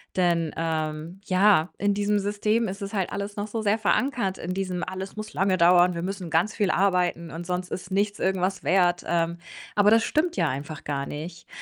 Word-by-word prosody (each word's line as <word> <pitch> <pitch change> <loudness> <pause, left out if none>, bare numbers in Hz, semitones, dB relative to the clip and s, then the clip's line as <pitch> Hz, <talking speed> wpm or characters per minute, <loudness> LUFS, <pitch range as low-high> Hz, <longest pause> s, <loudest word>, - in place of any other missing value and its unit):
Denn 170 -3 +1
ähm, 160 +2 -3
ja, 185 -3 +4
in 205 0 +2
diesem 205 0 +1
System 210 +3 0
ist 195 +2 -6
es 200 +2 -6
halt 190 -3 -1
alles 200 +1 -4
noch 205 0 -3
so 220 +1 -3
sehr 210 +2 +2
verankert 215 -3 0
in 180 +2 -4
diesem: 185 -2 -3
„Alles 190 +2 -6
muss 215 0 -7
lange 190 -1 +1
dauern, 175 +1 +5
wir 170 - -3
müssen 185 -2 -4
ganz 175 +8 +1
viel 205 -3 +1
arbeiten 180 -3 +1
und 170 +1 -6
sonst 180 0 -3
ist 185 - -5
nichts 205 +1 0
irgendwas 190 0 0
wert.“ 175 -2 +2
Ähm, 170 0 0 0.4
aber 205 0 +5
das 225 0 +5
stimmt 340 +3 0
ja - - +2
einfach 145 +3 -5
gar 140 -1 -2
nicht. 165 +3 -7
185 Hz, 200 wpm, -25 LUFS, 170-205 Hz, 0.4 s, dauern